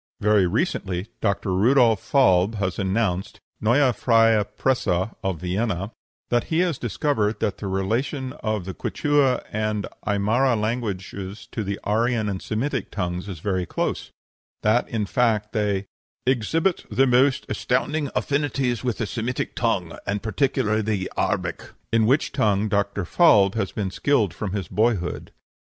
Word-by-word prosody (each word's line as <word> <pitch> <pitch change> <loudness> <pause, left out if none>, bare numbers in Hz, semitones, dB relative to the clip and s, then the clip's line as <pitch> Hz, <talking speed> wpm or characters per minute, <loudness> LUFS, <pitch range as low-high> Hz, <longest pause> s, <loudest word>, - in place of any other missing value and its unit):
Very 105 -3 +3
recently 95 - -1
Dr. 100 -2 0
Rudolf 115 +1 +4
Falb 105 -6 +3
has 95 -2 -2
announced 95 -1 -1 0.2
(Neue 125 +4 +3
Freie 115 -2 +4
Presse, 130 -2 +1
of 95 -1 -1
Vienna) 95 +2 -2 0.4
that 120 -1 +2
he 160 +2 +1
has 175 -6 0
discovered 110 -2 0
that 100 - -1
the 100 - -4
relation 120 +8 -1
of 110 -4 -2
the 95 - -5
Quichua 145 +2 +1
and 110 -1 -1 0.2
Aimara 110 +5 +2
languages 105 -2 -4
to 110 - -3
the 100 0 -3
Aryan 110 0 +1
and 95 -2 -4
Semitic 125 +2 -2
tongues 90 0 -3
is 85 -5 -7
very 95 -3 -1
close; - - -2 0.5
that, 110 +3 +2
in 110 -3 -1
fact, 110 -1 +1
they 105 -3 0 0.4
"exhibit 160 - +1
the 130 +6 +3
most 130 +1 +3
astounding 140 +4 -1
affinities 135 -4 0
with 125 -3 -1
the 110 - -1
Semitic 120 +3 -3
tongue, 95 -8 -1
and 100 0 -2
particularly 110 -2 +1
the 105 -3 -2
Arabic," - - -2 0.2
in 110 -1 +4
which 135 +5 +2
tongue 105 -6 +1
Dr. 100 -2 0
Falb 100 - +5
has 100 -4 -2
been 100 -3 -3
skilled 110 -5 +1
from 100 +1 -4
his 100 -4 -3
boyhood. 105 -4 0
110 Hz, 145 wpm, -24 LUFS, 100-125 Hz, 0.5 s, Falb